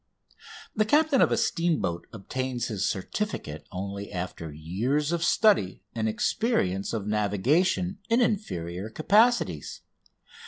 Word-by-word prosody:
The 215 - +3
captain 295 +4 +3
of - - +4
a - - +2
steamboat 155 - 0
obtains 125 +4 -3
his 100 -5 0
certificate 95 - -4
only 100 +2 -5
after 90 -4 -5
years 110 - -1
of 170 -1 0
study 170 - +3
and 110 -1 -1
experience 100 - 0
of 110 -4 -3
navigation 125 - +1
in 230 +2 +4
inferior 110 - -1
capacities. 200 - +2
115 Hz, 115 wpm, -27 LUFS, -, -, of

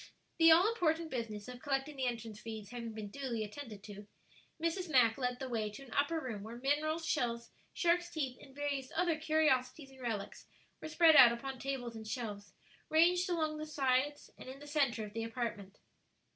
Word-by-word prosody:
The 330 0 +8
all 345 +5 +7
important 330 -7 0
business 220 -5 -4
of 250 0 -9
collecting 275 +1 -1
the 260 -2 -1
entrance 225 -3 -4
fees 220 -3 -7
having 235 -2 -5
been 215 -2 -6
duly 245 -5 -3
attended 215 -2 -8
to, 205 -1 -10 0.5
Mrs. 335 +2 -1
Mack 245 -6 +5
led 250 -2 -2
the 265 - -5
way 225 -4 -1
to 210 +6 -10
an 265 - -11
upper 290 +3 +1
room 235 -8 -5
where 225 +3 -8
minerals, 305 +5 0
shells, 235 -7 -1 0.2
sharks' 345 0 +1
teeth, 280 -7 -3
and 270 - -15
various 280 -2 -3
other 340 -1 +2
curiosities 305 -3 +1
and 265 -1 -15
relics 220 -5 -4 0.3
were 315 - -6
spread 320 0 +6
out 240 -4 +10
upon 260 +2 -5
tables 255 -4 -4
and 220 -1 -8
shelves, 210 -4 -5 0.4
ranged 355 +3 +4
along 315 -3 0
the 310 - -5
sides 280 0 0
and - - -9
in 265 - -8
the 290 - -12
centre 275 -7 0
of 205 - -11
the 225 0 -3
apartment. 225 -4 -4
265 Hz, 190 wpm, -34 LUFS, 230-310 Hz, 0.5 s, out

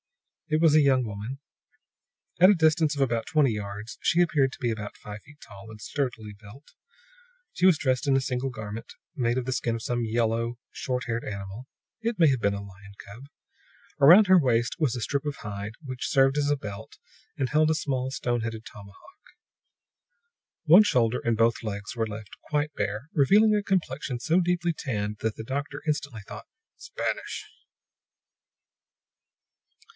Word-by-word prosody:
It 155 -2 +1
was 160 -2 +5
a 155 - +7
young 130 -3 +3
woman. 110 +5 -6 1.0
At 185 +2 +8
a 205 - +6
distance 160 -2 +2
of 140 - -2
about 115 -4 0
twenty 150 -5 +3
yards 105 +1 -7
she 170 - +2
appeared 150 -6 +3
to - - -12
be 120 -3 0
about 105 -2 -6
five 105 0 -9
feet 150 0 -18
tall 100 0 -13
and 110 -1 -11
sturdily 115 -4 -4
built. 105 +7 -16 0.8
She 180 - +3
was 180 -4 +5
dressed 130 +1 0
in 135 -1 +4
a - - +3
single 130 0 -2
garment, 110 -2 -8 0.2
made 120 -3 0
of 130 - -2
the 130 - -1
skin 120 -2 -1
of 115 - -6
some 120 -1 -1
yellow, 115 +1 -1
short 125 -1 -3
haired 115 -1 -2
animal. 100 +4 -7 0.3
It 230 -1 -2
may 165 - +6
have 130 -3 0
been 100 0 +1
a 100 - -6
lion 100 +1 -13
cub. 115 +7 -12 0.7
Around 180 +9 +8
her 185 -1 +7
waist 120 -5 +1
was 150 -8 +1
a 120 - -4
strip 140 +5 -1
of 145 -2 -4
hide, 105 0 -6
which 130 -2 -4
served 135 +1 +3
as 145 -1 +1
a 145 - +2
belt, 105 -2 -9 0.4
and 135 - 0
held 155 +3 +3
a 160 - +2
small, 130 -4 -2
stone 120 -3 -1
headed 110 0 -5
tomahawk. 100 -1 -12 1.7
One 175 +6 +8
shoulder 125 - +1
and 115 -1 +1
both 115 +1 +2
legs 105 +2 -5
were 115 -1 -1
left 105 -2 -8 0.2
quite 150 0 0
bare, 110 +1 -3
revealing 210 +10 +5
a 205 - 0
complexion 140 -10 -2
so 165 +8 +2
deeply 175 -1 0
tanned 105 -8 -4
that 110 -1 -2
the 110 - -7
doctor 140 +3 -4
instantly 140 -7 -2
thought: - - -9 0.3
"Spanish!" 470 0 -4
125 Hz, 175 wpm, -26 LUFS, 110-150 Hz, 1.7 s, At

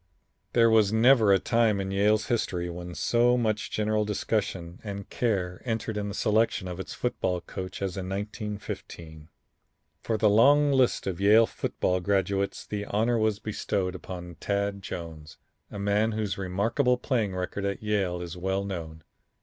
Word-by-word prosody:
There 115 -1 +5
was 110 -2 +4
never 110 -1 +5
a 95 - +6
time 115 0 +2
in 95 0 -3
Yale's 105 +2 +2
history 90 -7 -1
when 90 0 -7
so 120 +1 +3
much 110 -3 -1
general 105 0 0
discussion 95 -4 -2
and 100 -2 -6
care 95 -7 -1
entered 115 -2 -2
into 105 -1 -2
the - - -5
selection 110 -2 +1
of 90 0 -6
its 95 - -6
football 95 -7 -1
coach 95 +2 -7
as 95 -2 -3
in 95 -1 -4
1915. 100 -6 -6 0.7
From 110 - -1
the 110 - +3
long 140 +8 +5
list 130 -3 +2
of 95 -1 -3
Yale 110 +3 +6
football 90 -4 -1
graduates 100 +1 0
the 105 -1 -4
honor 115 +4 +1
was 110 -2 +1
bestowed 100 -3 -2
upon 90 -2 -8
Tad 100 0 -1
Jones, 80 -4 -8 0.3
a - - -8
man 105 +2 +1
whose 105 -3 -2
remarkable 110 +7 +1
playing 115 -7 -1
record 90 +2 -3
at 100 +1 -3
Yale 95 -5 0
is 85 -1 -7
well 95 +2 -1
known. 80 -5 -6
100 Hz, 160 wpm, -27 LUFS, 95-110 Hz, 0.7 s, a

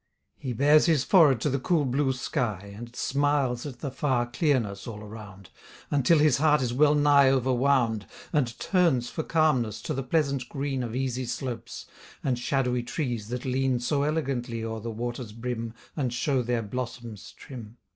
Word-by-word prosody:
He 130 -3 -5
bares 145 +7 +4
his 155 -6 +3
forehead 150 - +5
to 150 - +1
the 135 - 0
cool 155 +1 +1
blue 135 +2 +1
sky, 110 - -3
And 120 +3 -9
smiles 140 -2 0
at 125 -4 -9
the 140 - -3
far 130 -3 0
clearness 120 -6 0
all 105 -2 -7
around, 100 -3 -11 0.4
Until 145 +3 +4
his 150 -3 +4
heart 150 0 +4
is 120 -1 -1
well 150 +3 +4
nigh 145 -2 +5
over 130 -1 +2
wound, 120 -5 +1 0.3
And 125 -7 0
turns 160 -11 +1
for - - -2
calmness 150 -10 +1
to 155 - -2
the 135 - -2
pleasant 140 -2 0
green 135 -1 -2
Of 120 -1 -4
easy 130 -1 -2
slopes, 120 -2 -5 0.4
and 125 -3 0
shadowy 125 -1 0
trees 120 -4 -3
that 125 +2 -5
lean 130 -1 +1
So 140 +4 0
elegantly 135 -6 -1
o'er 110 0 -4
the 115 +2 -5
waters' 120 0 -5
brim 115 -1 -4 0.2
And 130 -5 -1
show 130 +2 0
their 120 -1 -1
blossoms 120 -1 -6
trim. 120 -4 -10
125 Hz, 175 wpm, -27 LUFS, 120-140 Hz, 0.4 s, forehead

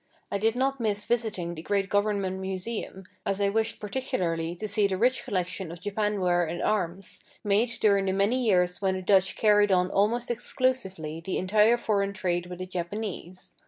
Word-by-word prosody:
I 200 - -1
did 225 +2 +2
not 270 +1 0
miss 210 -3 -1
visiting 215 -8 -1
the 160 - -7
great 195 +2 0
government 200 -2 0
museum, 190 +1 -5 0.2
as 195 0 -1
I 200 0 +2
wished 220 +2 -1
particularly 180 -8 -2
to 215 +5 -5
see 210 0 +2
the 190 -1 -2
rich 245 +3 +2
collection 185 -5 -2
of 170 - -9
Japan 205 +2 -1
ware 175 -1 +2
and 170 +1 -4
arms, 190 -2 -2 0.2
made 210 +3 +2
during 200 -2 +3
the - - +2
many 205 +7 +1
years 180 -4 +2
when 190 -1 +1
the 185 - -5
Dutch 190 0 +3
carried 210 -1 +4
on 180 0 +2
almost 235 +5 +1
exclusively 190 - -1
the 190 - -2
entire 210 +5 +4
foreign 200 -4 0
trade 175 -2 -1
with 180 0 -7
the 185 - -5
Japanese. 185 0 -6
200 Hz, 185 wpm, -27 LUFS, 185-215 Hz, 0.2 s, carried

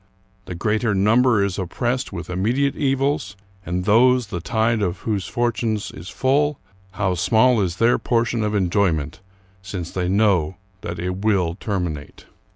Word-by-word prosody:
The 90 - -6
greater 105 +3 0
number 115 +2 +3
is 100 0 -2
oppressed 120 +8 -2
with 90 -3 -6
immediate 125 +10 0
evils, 135 -7 0 0.3
and 90 0 -3
those 125 +4 +4
the 95 -4 -5
tide 110 +4 0
of 90 -2 -2
whose 105 -4 -2
fortunes 115 -3 -1
is 80 +4 -10
full, 145 +2 +1 0.4
how 95 -3 0
small 110 +6 +3
is 90 -3 -1
their 115 +5 +3
portion 115 -1 0
of 105 0 -1
enjoy^ 95 -2 +2
ment, 75 +3 -6 0.4
since 95 -3 -6
they 90 -1 -2
know 95 -4 +2 0.3
that 85 +1 -5
it 90 +2 -3
will 95 -6 +2
terminate! 85 -7 -5
105 Hz, 155 wpm, -22 LUFS, 90-120 Hz, 0.4 s, those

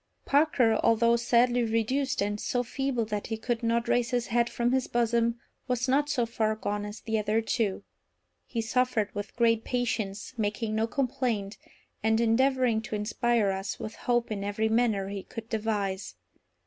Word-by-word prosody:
Parker, 275 -6 +3
although 230 +1 +4
sadly 240 +1 +3
reduced, 235 +3 0
and 205 +1 -2
so 245 -1 0
feeble 250 -1 -1
that 210 -1 -3
he 225 - -3
could 235 +1 -2
not 230 0 +1
raise 240 -1 +2
his 245 -2 0
head 235 0 +1
from 240 0 0
his 260 -1 +1
bosom, 235 0 +1 0.3
was 250 0 0
not 285 +3 +2
so 245 -5 +1
far 220 -1 0
gone 205 -1 -3
as 210 +1 -8
the 220 -1 -1
other 215 +1 +1
two. 220 -3 -1 0.6
He 230 - -2
suffered 230 -3 0
with 205 0 -6
great 230 -1 +3
patience, 235 -4 -2
making 215 +1 -1
no 220 +1 +1
complaint, 235 -6 -2 0.4
and 220 +1 +2
endeavouring 245 0 +3
to 215 - -5
inspire 215 0 +1
us 190 0 -4
with 215 - -5
hope 240 -2 0
in 200 -2 -3
every 205 +2 0
manner 220 -4 +1
he 200 -1 -4
could 225 +3 -9
devise. 205 - -2
230 Hz, 170 wpm, -28 LUFS, 215-245 Hz, 0.6 s, although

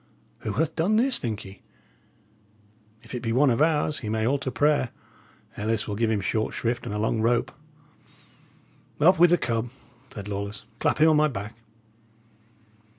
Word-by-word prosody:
Who 110 - -4
hath 155 +7 -1
done 180 +7 +2
this, 255 +4 +2
think 110 -4 -4
ye? 95 +1 -12 1.4
If 115 - -13
it 125 - -3
be 115 - -2
one 130 +3 +4
of 120 - +1
ours, 155 -1 +2
he 110 - -5
may 110 0 0
all 140 +4 +1
to 135 - -3
prayer; 145 -2 +2 0.7
Ellis 110 +1 -1
will 105 - -3
give 115 +1 +1
him 105 -2 0
a - - -9
short 110 +2 -1
shrift 120 +1 -2
and 105 - -4
a - - -1
long 110 +1 0
rope." 115 +1 +1 1.5
"Up 180 +5 +5
with 175 0 +7
the 175 - +4
cub," 115 -3 -2 0.4
said 100 -2 -8
Lawless. 100 +1 -5
"Clap - - +1
him 155 +1 +5
on 155 - +4
my 155 0 +4
back." 110 -5 -6
120 Hz, 180 wpm, -25 LUFS, 110-150 Hz, 1.5 s, with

